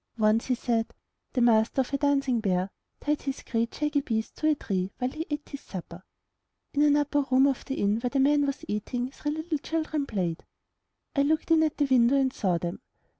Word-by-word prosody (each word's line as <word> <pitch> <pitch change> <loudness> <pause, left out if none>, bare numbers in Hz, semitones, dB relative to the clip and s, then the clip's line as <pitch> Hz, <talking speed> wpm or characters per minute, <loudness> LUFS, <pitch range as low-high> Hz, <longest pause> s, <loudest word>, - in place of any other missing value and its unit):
"Once/* 215 +1 +2
he 255 - +2
said, 230 -2 -1 0.4
*'the 255 - +1
Master 230 +2 +4
of 260 - -5
a - - +3
dancing 275 -4 +2
bear 190 -2 0 0.3
tied 295 0 0
his 275 -1 -4
great 230 0 -1
shaggy 300 -1 0
beast 220 -4 -3
to 310 - 0
a 310 - +4
tree 190 -7 -2
while 250 +1 -1
he 320 +4 -5
ate 295 0 -4
his 280 - -7
supper. 175 -2 -8 0.7
In 290 - +2
an 295 -1 +5
upper 290 0 +1
room 260 +1 +5
of 275 -2 0
the 270 - -3
inn 205 +2 +1
where 245 +1 -1
the 275 - 0
man 285 +1 +4
was 275 - -4
eating, 245 +5 -2
three 295 - -4
little 315 0 -2
children 310 -2 -2
played. 180 -7 -2 0.7
I 280 - +3
looked 310 +3 +1
in 325 -1 +6
at 310 -2 +1
the 290 - +3
window 255 -1 +4
and 265 -1 +2
saw 185 -5 +1
them. 175 +6 -4
265 Hz, 215 wpm, -27 LUFS, 220-290 Hz, 0.7 s, in